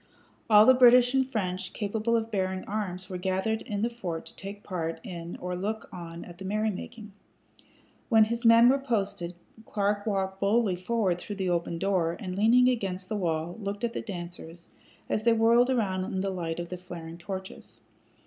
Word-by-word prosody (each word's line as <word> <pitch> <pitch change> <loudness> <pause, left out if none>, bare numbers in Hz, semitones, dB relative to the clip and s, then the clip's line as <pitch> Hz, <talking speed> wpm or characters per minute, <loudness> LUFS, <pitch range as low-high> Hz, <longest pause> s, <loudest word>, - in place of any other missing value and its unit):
All 210 -1 +8
the 260 - +8
British 250 0 +6
and 265 -1 +2
French 185 -4 -3
capable 220 +2 -1
of 225 0 -1
bearing 190 -2 -1
arms 190 -3 -3
were 185 -2 -5
gathered 190 +4 -1
in 205 0 -3
the 235 - +2
fort 180 -9 -5
to - - -9
take 200 +1 -8
part 165 -4 -3
in 175 -5 -7
or 180 0 -3
look 210 +4 -4
on 170 -1 -8
at 175 -1 -12
the - - -7
merrymaking. 215 +2 -3 1.0
When 225 -3 +6
his 235 +2 -2
men 230 +1 +7
were 270 +2 +4
posted 200 -9 -2 0.3
Clark 205 0 -1
walked 190 -2 -1
boldly 200 -1 +2
forward 185 -1 0
through 205 - -6
the 190 -2 -1
open 170 -1 -1
door, 175 -3 0
and, 185 -2 -5
leaning 235 +5 +5
against 195 -7 -1
the 215 - -1
wall, 170 0 -2
looked 200 +2 -4
at 235 -1 -1
the - - -3
dancers 175 -4 -8 0.4
as 215 - -1
they 235 0 +5
whirled 230 +2 +4
around 195 -7 0
in 190 0 -3
the 195 0 -1
light 170 -3 -3
of 170 0 -5
the 180 - -5
flaring 170 -2 -9
torches. 190 +1 -8
195 Hz, 185 wpm, -28 LUFS, 180-225 Hz, 1.0 s, All